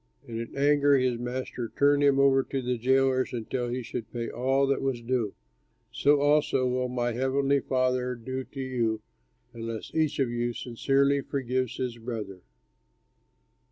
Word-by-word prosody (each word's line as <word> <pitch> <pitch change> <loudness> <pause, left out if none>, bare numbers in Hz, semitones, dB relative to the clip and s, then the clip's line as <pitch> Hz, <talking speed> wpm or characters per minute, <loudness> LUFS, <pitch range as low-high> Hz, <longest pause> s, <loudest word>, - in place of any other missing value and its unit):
And 115 -1 -5
in 115 +3 -7
anger 145 0 +4
his 125 -2 +1
master 120 -1 -4
turned 145 0 +4
him 140 -1 +4
over 135 -1 +5
to 135 0 -3
the 125 -1 -1
jailers 130 +1 +2
until 120 +1 -3
he 125 +1 -3
should 115 -1 -6
pay 120 -1 -4
all 135 +3 +1
that 135 0 0
was 135 -3 -1
due. 120 -3 -1 0.6
So 145 +1 +3
also 145 -3 +3
will 125 0 0
my 120 -1 -1
heavenly 135 +3 +1
Father 130 -1 0
do 130 +3 -5
to 135 - -11
you 115 -4 -1 0.5
unless 115 -1 -6
each 155 -2 +1
of 130 -4 +1
you 120 0 -1
sincerely 140 +4 +1
forgives 130 -3 -2
his 125 -2 -3
brother." 110 -5 -6
130 Hz, 155 wpm, -28 LUFS, 120-135 Hz, 0.6 s, over